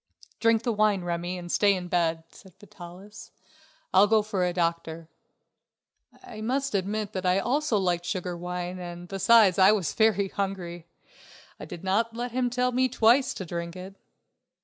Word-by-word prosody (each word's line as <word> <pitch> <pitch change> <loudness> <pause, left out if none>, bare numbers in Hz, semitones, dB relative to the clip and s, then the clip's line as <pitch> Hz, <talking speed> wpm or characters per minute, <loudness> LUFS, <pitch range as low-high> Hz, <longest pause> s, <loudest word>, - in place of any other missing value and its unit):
"Drink 230 -1 +2
the 235 - 0
wine, 210 -3 +2
Remi, 175 +1 -3
and 175 -1 -7
stay 200 -1 +3
in 180 -1 -5
bed," 165 -2 0
said 190 -4 -17
Vitalis. 190 +2 -12 0.6
"I'll 195 +2 +6
go 215 0 +3
for 205 -3 -2
a 180 - +1
doctor." 165 -2 -3 1.1
I 215 -3 -10
must 270 +4 -1
admit 205 +2 -2
that 185 - -4
I 180 0 +2
also 255 +3 0
liked 175 -2 -1
sugared 180 -3 -3
wine 180 +1 -5
and 175 0 -8
besides 195 0 +4
I 190 +2 +7
was 195 -7 -1
very 205 -3 +2
hungry. 180 -4 -5 0.7
I - - -7
did 170 - -10
not 220 +5 0
let 240 +1 -4
him 250 0 0
tell 250 +1 0
me 255 +1 +1
twice 245 +3 +3
to 190 - -6
drink 170 0 -5
it. 185 +1 -9
190 Hz, 170 wpm, -26 LUFS, 175-220 Hz, 1.1 s, I